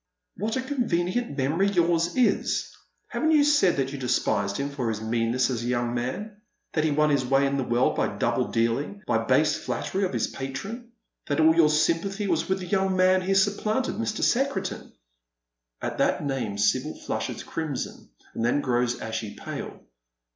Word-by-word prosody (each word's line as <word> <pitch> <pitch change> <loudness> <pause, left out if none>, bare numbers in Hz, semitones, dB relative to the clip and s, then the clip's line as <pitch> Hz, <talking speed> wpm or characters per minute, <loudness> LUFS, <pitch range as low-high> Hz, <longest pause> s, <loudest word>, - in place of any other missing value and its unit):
" - - -41
What 215 +4 -2
a 260 - -2
convenient 235 - -1
memory 155 +9 +2
yom 175 -4 +2
s 170 +1 0
is! 250 -2 +1 0.3
Haven't 315 0 +1
you 300 -2 +6
said 290 -11 +4
that 135 -1 0
you 140 - -6
despised 100 -5 0
him 140 +1 -2
for 130 -5 -2
his 110 -1 -2
meanness 115 +3 0
as 120 -2 -2
a 120 - -3
young 120 -1 0
man 195 - -4
— - - -49
that 155 - +1
he 160 - +2
won 150 +1 +2
his 140 -2 +2
way 135 +2 +3
in 140 0 0
the 135 - 0
world 120 +1 +1
by - - -1
double - - +1
dealing, 120 - -1
by 115 - +2
base 135 +6 +3
flattery 145 +10 -3
of 185 - 0
his - - +1
patron 195 - -6 0.2
— - - -46
that 145 - 0
all 160 +1 +6
your 165 -2 +5
sympathy 170 +6 +1
was 170 -3 0
with 190 0 0
the - - -5
young 190 +1 +1
man 185 0 +4
he 195 +1 0
supplanted, 215 +5 +1
Mr. 225 -1 -2
Secretan? 240 -8 0 0.4
" - - -55
At - - -3
that - - +1
name 125 -7 -2
Sibyl 100 0 +1
flushes - - -3
crimson, 155 -6 -5 0.2
and 115 - -3
then 120 +5 +2
grows 125 -2 0
ashy 110 -2 -4
pale. - - -7
150 Hz, 195 wpm, -26 LUFS, 125-195 Hz, 0.4 s, you